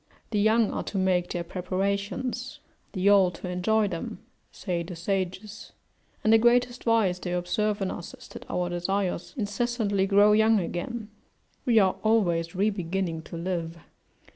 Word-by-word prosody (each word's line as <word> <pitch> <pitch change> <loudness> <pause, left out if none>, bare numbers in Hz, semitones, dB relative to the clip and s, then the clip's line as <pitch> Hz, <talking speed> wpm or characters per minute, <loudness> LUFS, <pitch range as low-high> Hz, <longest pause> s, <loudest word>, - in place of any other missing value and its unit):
The 210 - +1
young 220 +1 +3
are - - -2
to 200 - -4
make 185 -2 +1
their 175 -1 -3
preparations, 200 +7 -3 0.3
the 190 -1 0
old 190 -3 +4
to - - -7
enjoy 210 +4 +1
them, 170 -2 -5 0.3
say 175 -3 -3
the 170 +1 -7
sages: 190 +4 -4 0.5
and 220 - +4
the 225 - +7
greatest 245 +1 +2
vice 220 -6 +2
they 180 - -4
observe 200 +4 0
in 190 - -1
us 170 - -7
is - - -14
that - - -11
our 180 0 -1
desires 180 - -2
incessantly 205 -2 0
grow 205 +1 +5
young 220 0 +4
again; 210 +5 -4 0.6
we 235 -2 +4
are 190 -3 +4
always 180 -6 +1
re 205 +3 +2
beginning 180 -3 -3
to 165 - -9
live. 170 -1 -3
195 Hz, 160 wpm, -27 LUFS, 180-215 Hz, 0.6 s, the